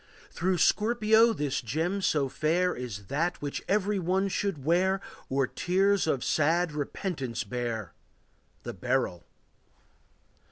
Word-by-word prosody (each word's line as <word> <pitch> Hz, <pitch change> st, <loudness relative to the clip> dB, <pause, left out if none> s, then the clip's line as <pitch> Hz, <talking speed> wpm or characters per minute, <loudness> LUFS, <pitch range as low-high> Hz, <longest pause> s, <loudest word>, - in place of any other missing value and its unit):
Through 185 Hz, +2 st, 0 dB
Scorpio 220 Hz, +4 st, +4 dB
this 145 Hz, -10 st, -2 dB
gem 160 Hz, -, -1 dB
so 150 Hz, -6 st, +1 dB
fair 170 Hz, +6 st, +1 dB
Is 110 Hz, -6 st, -6 dB
that 170 Hz, -, -1 dB
which 145 Hz, -1 st, -4 dB
every 205 Hz, 0 st, +1 dB
one 190 Hz, +3 st, +1 dB
should 185 Hz, -8 st, -2 dB
wear, 185 Hz, +4 st, +2 dB, 0.3 s
Or 135 Hz, 0 st, +2 dB
tears 190 Hz, +6 st, +1 dB
of 135 Hz, -5 st, 0 dB
sad 165 Hz, +3 st, +2 dB
repentance 145 Hz, -, -3 dB
bear,— 115 Hz, -3 st, -4 dB, 0.7 s
The -, -, -5 dB
beryl. 125 Hz, -5 st, -1 dB
165 Hz, 120 wpm, -28 LUFS, 130-190 Hz, 0.7 s, Scorpio